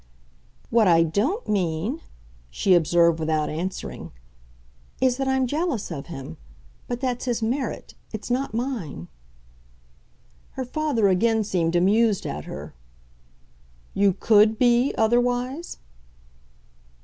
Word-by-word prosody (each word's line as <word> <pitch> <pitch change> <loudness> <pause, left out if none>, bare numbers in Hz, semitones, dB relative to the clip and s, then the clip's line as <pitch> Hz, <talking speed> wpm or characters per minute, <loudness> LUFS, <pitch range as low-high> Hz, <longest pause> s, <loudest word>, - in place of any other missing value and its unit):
"What 225 -3 +4
I 165 -1 +5
DON'T 225 - -1
mean," 195 - -1 0.5
she 185 - +2
observed 170 -1 +4
without 155 -1 0
answering, 180 +5 -5 0.9
"is 255 -1 +2
that 270 -1 -2
I'm 265 -1 +2
jealous 290 - -2
of 140 -4 -6
him. 135 - -8 0.5
But 245 +1 -4
that's 250 -2 -2
his 240 -2 -1
merit 250 +2 -3 0.2
it's 220 +2 -6
not 260 +3 0
mine." 220 - -4 1.4
Her 260 - -4
father 270 -5 0
again 220 +4 +2
seemed 175 -4 0
amused 205 +4 +3
at 75 +1 -5
her. - - -8 1.2
"You 200 -1 +3
COULD 215 +2 +4
be 245 +2 +3
otherwise?" 245 +7 0
220 Hz, 115 wpm, -24 LUFS, 175-250 Hz, 1.4 s, I